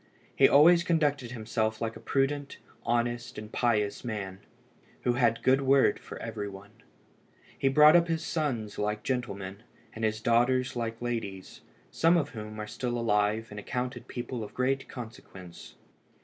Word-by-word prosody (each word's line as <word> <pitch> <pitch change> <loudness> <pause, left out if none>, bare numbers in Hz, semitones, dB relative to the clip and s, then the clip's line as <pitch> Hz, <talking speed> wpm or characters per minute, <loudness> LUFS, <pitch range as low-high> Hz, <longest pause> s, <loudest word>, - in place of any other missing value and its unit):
He - - +6
always 170 +4 +7
conducted 145 -7 +1
himself 110 -2 -2
like 115 -1 -3
a - - -9
prudent, 140 +1 -1 0.3
honest, 120 +1 -1
and 110 0 -8
pious 105 -4 0
man, 100 -5 -5 0.6
who 125 - +2
had 120 -2 +2
a - - -21
good 130 +1 +3
word 135 0 +4
for - - -9
every 105 -3 -5
one. 100 +1 -12 0.8
He - - 0
brought 150 +3 +7
up 170 0 +5
his 165 -1 -2
sons 125 -10 -2
like 105 +1 -1
gentlemen, 100 -6 -3 0.3
and 110 - -7
his 110 0 0
daughters 125 +3 +2
like 115 -1 -3
ladies, 100 -6 -5 0.3
some 165 +2 +4
of 145 -3 0
whom 110 -2 -8
are 105 - -3
still 120 +3 -3
alive, 110 -1 +1
and 105 - -6
accounted 125 +2 -4
people 120 -1 -5
of 105 - -10
great 135 +1 0
consequence. 105 -7 -10
120 Hz, 160 wpm, -29 LUFS, 110-135 Hz, 0.8 s, always